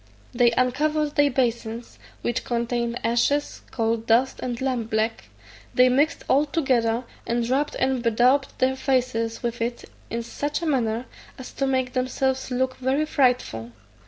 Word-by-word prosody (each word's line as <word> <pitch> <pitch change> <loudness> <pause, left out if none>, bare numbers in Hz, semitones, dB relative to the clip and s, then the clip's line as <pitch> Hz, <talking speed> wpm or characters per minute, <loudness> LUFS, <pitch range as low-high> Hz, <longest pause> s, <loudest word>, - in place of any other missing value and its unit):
They 240 -1 +5
uncovered 295 +5 +1
their 290 -1 +4
basins, 235 -3 -2 0.2
which 240 - -1
contained 235 0 -1
ashes, 240 +5 +1
coal 230 -1 0
dust, 230 +3 +1
and 245 -2 -3
lamp 255 -4 -1
black; 220 +1 -1 0.5
they 250 0 +6
mixed 285 +5 +1
all 290 +3 +3
together, 250 -6 +1 0.2
and 235 0 0
rubbed 275 +4 0
and 260 -2 0
bedaubed 245 +4 +3
their 260 +1 +2
faces 255 -4 -1
with 235 -1 -3
it 235 +1 -3 0.2
in 235 0 -3
such 290 +5 -3
a - - -1
manner 240 -5 0 0.3
as 260 - -9
to 275 - -1
make 260 -2 0
themselves 260 +1 -1
look 255 0 -1
very 265 +4 +1
frightful. 245 - 0
250 Hz, 150 wpm, -24 LUFS, 235-265 Hz, 0.5 s, they